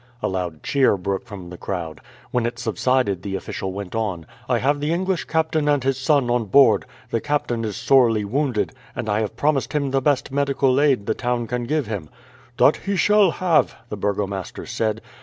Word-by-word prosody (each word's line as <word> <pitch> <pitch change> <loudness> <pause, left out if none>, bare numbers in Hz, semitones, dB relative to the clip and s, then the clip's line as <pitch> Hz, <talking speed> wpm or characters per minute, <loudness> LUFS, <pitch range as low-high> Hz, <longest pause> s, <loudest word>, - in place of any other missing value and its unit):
A - - +2
loud 90 -4 -4
cheer 135 -7 +3
broke 95 +1 -3
from 95 -4 -9
the 90 - -9
crowd. 85 -5 -5 0.3
When 120 -1 +1
it 120 0 -5
subsided 115 -3 0
the 95 0 -4
official 95 0 -4
went 95 -1 -6
on: 100 -7 -2 0.2
"I 125 - +3
have 145 +4 +1
the 150 +2 -1
English 185 +1 0
captain 160 -2 0
and 145 -3 +2
his 135 0 0
son 140 -1 +2
on 120 -2 +1
board. 115 -2 +5 0.3
The 115 - 0
captain 145 -6 -1
is 105 -2 -3
sorely 115 -3 +3
wounded, 125 0 -1 0.2
and - - -4
I 105 0 +1
have 110 +1 -3
promised 145 0 +1
him 140 -3 0
the 135 0 +1
best 140 -1 +1
medical 140 -1 +2
aid 135 -9 +2
the - - +1
town 120 -1 -1
can 120 +1 -3
give 150 +2 0
him." 100 -8 -5 0.5
"That - - +5
he 200 - -3
shall 210 0 +4
have," 170 -2 +2
the - - -4
burgomaster 100 -3 -3
said. 110 0 -2
120 Hz, 195 wpm, -22 LUFS, 100-140 Hz, 0.5 s, board